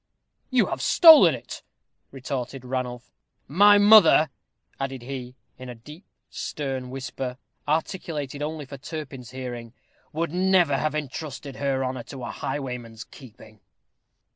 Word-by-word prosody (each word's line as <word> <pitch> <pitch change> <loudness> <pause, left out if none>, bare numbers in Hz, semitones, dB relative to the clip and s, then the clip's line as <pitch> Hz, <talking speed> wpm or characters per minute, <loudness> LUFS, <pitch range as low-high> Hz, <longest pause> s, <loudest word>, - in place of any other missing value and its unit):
"You 255 -2 +3
have - - -4
stolen 325 -3 +8
it," - - -9 0.5
retorted 130 -1 -6
Ranulph. 125 -1 -5 0.4
"My 205 +7 +6
mother," 205 -6 +6 0.5
added 135 -2 -4
he, 125 -1 -7 0.2
in 130 0 -9
a 125 - -8
deep, 150 - -14 0.3
stern 135 -3 -5
whisper, 130 -1 -6 0.3
articulated 150 -3 -3
only 150 0 -4
for 140 +1 -10
Turpin's 135 -5 -8
hearing, 125 -2 -8 0.4
"would 160 +1 -3
never 180 -4 +3
have 155 +2 -1
entrusted 145 -1 -6
her 135 -1 -1
honor 130 -1 -3
to 130 0 -9
a - - -5
highwayman's 125 -5 -6
keeping." 110 -4 -16
135 Hz, 125 wpm, -24 LUFS, 125-155 Hz, 0.5 s, stolen